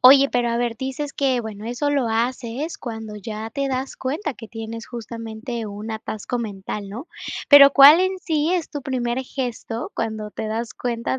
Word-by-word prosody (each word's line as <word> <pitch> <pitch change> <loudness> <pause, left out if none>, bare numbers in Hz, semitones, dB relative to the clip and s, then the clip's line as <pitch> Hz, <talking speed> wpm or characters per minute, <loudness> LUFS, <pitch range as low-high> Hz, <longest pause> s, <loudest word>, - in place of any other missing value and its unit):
Oye, 275 +2 +8
pero 245 -1 +2
a 235 - 0
ver 240 -1 0
dices 270 +2 -3
que, 265 -3 +1
bueno, 215 -1 -7
eso 245 +5 -1
lo 275 -5 +1
haces 240 +6 -2
cuando 220 -3 -6
ya 215 +2 -6
te 275 +3 -1
das 265 0 -2
cuenta 300 +6 -2
que 230 -3 -11
tienes 225 0 -7
justamente 230 0 -6
un 210 +2 -6
atasco 220 +2 -4
mental, 200 -2 -5
¿no? 240 - -7 0.4
Pero, 280 -1 +11
¿cuál 290 +5 +9
en 375 0 +1
sí 315 -2 0
es 345 -4 -2
tu 290 - -4
primer 250 -2 -1
gesto 245 -3 -4
cuando 220 -2 -3
te 220 - -5
das 225 +1 -3
cuenta 240 +1 -2
240 Hz, 180 wpm, -23 LUFS, 225-275 Hz, 0.4 s, Pero